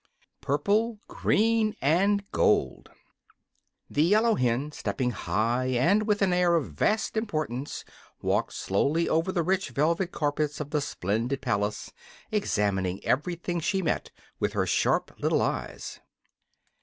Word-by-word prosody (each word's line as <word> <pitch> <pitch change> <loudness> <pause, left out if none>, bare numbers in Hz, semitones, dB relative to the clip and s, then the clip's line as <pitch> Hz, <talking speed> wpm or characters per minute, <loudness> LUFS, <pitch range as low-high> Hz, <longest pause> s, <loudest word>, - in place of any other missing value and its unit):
Purple, 210 - +1
Green, 220 0 +1
and 195 +8 +2
Gold - - +1 1.0
The 145 - 0
yellow 215 +7 +4
hen, 125 - 0
stepping 130 -3 -2
high 120 +3 0
and 170 - +2
with 210 -1 +2
an 185 -2 +2
air 180 -1 +3
of 145 - -1
vast 215 - 0
importance, 155 - -3 0.3
walked - - 0
slowly 145 - 0
over 165 +4 +1
the 175 -2 0
rich 190 +3 0
velvet 170 +5 0
carpets 150 0 -1
of 150 -1 -5
the 150 - +1
splendid 115 +2 -2
palace, 105 -4 -2 0.4
examining 100 - 0
everything 175 +4 -1
she 190 +4 0
met - - -1 0.3
with - - 0
her - - +1
sharp - - +1
little - - +2
eyes. - - -4
155 Hz, 130 wpm, -27 LUFS, 125-195 Hz, 1.0 s, yellow